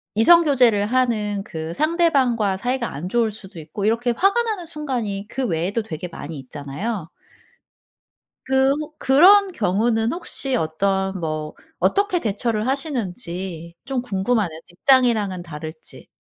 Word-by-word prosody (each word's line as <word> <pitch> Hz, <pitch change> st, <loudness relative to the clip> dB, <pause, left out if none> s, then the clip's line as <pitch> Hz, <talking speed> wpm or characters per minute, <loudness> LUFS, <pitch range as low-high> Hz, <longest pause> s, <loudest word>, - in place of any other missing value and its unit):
이성 335 Hz, +11 st, +7 dB
교제를 245 Hz, -9 st, +3 dB
하는 215 Hz, -4 st, 0 dB
그 160 Hz, -4 st, -6 dB
상대방과 270 Hz, -, +2 dB
사이가 245 Hz, +3 st, -2 dB
안 155 Hz, +6 st, -5 dB
좋을 230 Hz, 0 st, +1 dB
수도 195 Hz, -4 st, -11 dB
있고 160 Hz, +6 st, -7 dB
이렇게 235 Hz, +2 st, +1 dB
화가 395 Hz, -, +3 dB
나는 425 Hz, -6 st, -3 dB
순간이 245 Hz, -11 st, -4 dB
그 265 Hz, +2 st, -2 dB
외에도 185 Hz, +4 st, -1 dB
되게 175 Hz, -3 st, -6 dB
많이 160 Hz, -2 st, -8 dB
있잖아요. 150 Hz, -, -5 dB, 1.4 s
그 265 Hz, +1 st, +3 dB
혹 305 Hz, +1 st, -7 dB
그런 375 Hz, +9 st, +6 dB
경우는 225 Hz, -, +1 dB
혹시 275 Hz, -6 st, -1 dB
어떤 190 Hz, +2 st, -1 dB
뭐 155 Hz, -2 st, -4 dB, 0.2 s
어떻게 400 Hz, -2 st, +2 dB
대처를 215 Hz, -2 st, -1 dB
하시는지 190 Hz, -, -3 dB
좀 265 Hz, -1 st, -2 dB
궁금하네요. 195 Hz, -6 st, -1 dB
직장이랑은 215 Hz, -3 st, +2 dB
다를지. 155 Hz, -1 st, -9 dB
220 Hz, 295 characters per minute, -22 LUFS, 180-265 Hz, 1.4 s, 이성